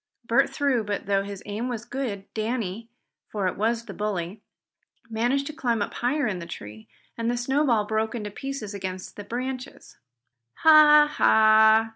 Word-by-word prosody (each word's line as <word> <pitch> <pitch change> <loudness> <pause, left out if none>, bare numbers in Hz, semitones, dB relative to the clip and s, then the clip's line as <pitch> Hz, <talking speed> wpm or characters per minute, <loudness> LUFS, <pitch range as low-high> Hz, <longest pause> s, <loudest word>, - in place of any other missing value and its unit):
Bert - - +3
threw, 275 -6 0
but 205 -1 -4
though 195 0 +1
his 200 -1 -8
aim 215 +4 -4
was 235 -2 -5
good, 235 -8 -4
Danny, 225 -1 -3 0.4
for 205 -3 -3
it - - -2
was 230 +3 -1
the - - -8
bully, 205 -1 -4 0.7
managed 245 +5 0
to 305 - -6
climb 245 -7 -1
up - - -7
higher 280 +5 0
in 190 -4 -2
the 170 - -8
tree, 110 -8 -10 0.3
and 230 0 0
the 240 - -1
snowball 245 -3 +1
broke 220 +2 -1
into 210 -3 -5
pieces 270 -3 -6
against 185 -2 -6
the 205 - -8
branches. 255 +4 -6 0.7
"Ha! 300 -1 +8
Ha!" 220 0 +5
220 Hz, 165 wpm, -25 LUFS, 205-255 Hz, 0.7 s, Ha